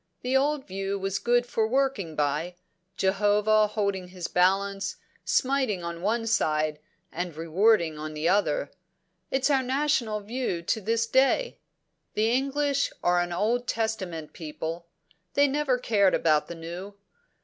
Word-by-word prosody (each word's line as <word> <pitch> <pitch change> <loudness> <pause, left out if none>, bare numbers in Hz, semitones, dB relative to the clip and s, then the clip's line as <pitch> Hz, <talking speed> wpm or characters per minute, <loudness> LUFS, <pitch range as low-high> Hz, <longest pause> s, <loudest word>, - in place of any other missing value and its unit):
The 255 +1 0
old 285 +1 +1
view 195 +1 -3
was 195 0 -2
good 240 0 +2
for 225 -2 0
working 250 - 0
by 150 +4 -1 0.4
Jehovah 210 +2 +3
holding 200 -3 -2
his 180 -1 -6
balance, 195 +2 +1 0.3
smiting 260 -9 +1
on 170 0 -5
one 225 +4 0
side, 155 -8 +1 0.3
and 175 -1 -4
rewarding 165 0 +2
on 155 0 -6
the 155 +2 -1
other. 175 -7 +1 0.6
It's 270 +2 +1
our 270 -2 +3
national 260 -5 0
view 215 -5 -3
to 220 +6 -1
this 230 +3 +1
day. 270 - +2 0.6
The 220 +2 +2
English 275 +2 +1
are 175 0 +3
an 175 0 -3
Old 230 +7 0
Testament 190 -9 -3
people; 165 +1 -6 0.5
they 285 0 +5
never 280 -2 +1
cared 205 -6 +3
about 155 -2 +2
the 170 - -7
New. 175 +5 -8
200 Hz, 140 wpm, -27 LUFS, 175-245 Hz, 0.6 s, they